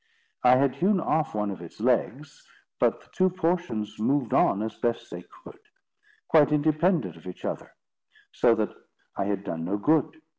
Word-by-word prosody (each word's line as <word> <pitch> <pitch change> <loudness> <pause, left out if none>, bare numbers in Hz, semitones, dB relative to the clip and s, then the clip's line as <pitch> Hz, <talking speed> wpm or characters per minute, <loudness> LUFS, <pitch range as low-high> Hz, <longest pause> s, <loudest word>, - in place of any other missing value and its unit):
I 125 0 +7
had 135 0 +1
hewn 195 +2 +2
off 160 -5 0
one 105 -1 -1
of 95 - -8
its 85 +3 -12
legs, 130 +4 -1 0.3
but - - +1
the - - -23
two 185 0 +2
portions 170 - -2
moved 130 +2 0
on 100 - +3
as 110 - -4
best 120 -1 -2
they - - -6 0.2
could, - - -13 0.7
quite 150 -2 +5
independent 155 - +1
of 80 - -14
each 90 - -8
other; - - -5 0.6
so 120 -2 +3
that 110 -1 -2 0.4
I - - -1
had 100 -1 -2
done 80 -4 -4
no 95 +5 -1
good. 155 +8 +1
125 Hz, 175 wpm, -26 LUFS, 105-155 Hz, 0.7 s, I